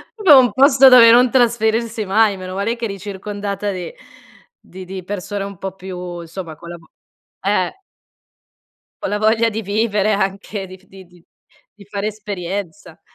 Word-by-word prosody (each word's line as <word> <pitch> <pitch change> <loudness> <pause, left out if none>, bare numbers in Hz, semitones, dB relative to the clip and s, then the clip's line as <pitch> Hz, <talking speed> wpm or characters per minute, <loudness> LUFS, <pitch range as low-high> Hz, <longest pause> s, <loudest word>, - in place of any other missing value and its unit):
propio 360 -11 +7
un 245 -3 +3
posto 270 +1 +6
dove 235 -3 +8
non 245 +1 +5
trasferirsi 230 -3 +1
mai, 205 0 +2
meno 185 0 -7
male 205 +4 -1
che 235 -1 -5
eri 195 -2 -6
circondata 200 0 -5
di 185 - -6 0.7
di 185 0 -12
di 185 0 -7
persone 200 +1 -5
un 200 -2 -8
po' 190 0 -6
più, 180 -2 -7
insomma, 165 -1 -8
collabo 170 0 -12 0.5
eh! 200 - -1 1.2
Con - - -2
la 205 - -1
voglia 225 +2 +2
di 220 +1 -5
vivere, 210 0 0
anche, 195 0 -3
di 185 - -12
di 190 0 -14
di 175 -1 -23 0.5
di 200 -2 -17
fare 200 0 -4
esperienza! 190 -6 -6
200 Hz, 155 wpm, -18 LUFS, 185-225 Hz, 1.2 s, dove